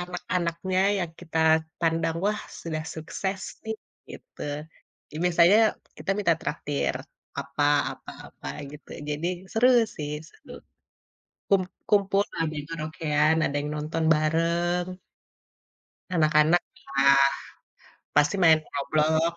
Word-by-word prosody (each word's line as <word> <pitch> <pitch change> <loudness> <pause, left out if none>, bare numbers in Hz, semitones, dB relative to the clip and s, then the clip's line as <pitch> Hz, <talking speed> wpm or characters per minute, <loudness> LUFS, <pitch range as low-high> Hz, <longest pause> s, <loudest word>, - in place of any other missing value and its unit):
anak-anaknya 180 0 -2 0.2
yang 175 -3 -2
kita 165 -2 -4 0.4
pandang, 165 0 +1
"Wah, 210 0 0 0.2
sudah 155 -2 -4
sukses 190 +4 -4 0.2
nih," 220 0 -2 0.4
gitu, - - -13 0.7
ya - - -7
biasanya 175 +3 +5 0.4
kita - - -4
minta 175 -5 +3
traktir 145 -1 -2 0.5
apa 140 +1 -3 0.3
apa - - -10 0.2
apa - - -13 0.2
gitu. 150 0 -13 0.2
Jadi 150 +3 -2 0.3
seru 235 +3 +4 0.3
sih, 150 -1 -4 0.2
seru, - - -20 1.0
kum 195 -2 +4 0.3
kumpul 200 -1 +3 0.2
ada 160 -1 0
yang 145 - -6
karaokean, 155 -1 +1
ada 140 - -1
yang 145 - -4
nonton 155 +2 -2
bareng. 170 +3 +1 1.2
Anak-anak, 155 0 +4 0.2
iya, 140 0 +3 1.0
pasti 150 +6 +3
main 160 -4 +6
Roblox. 155 +3 0
165 Hz, 110 wpm, -26 LUFS, 150-180 Hz, 1.2 s, main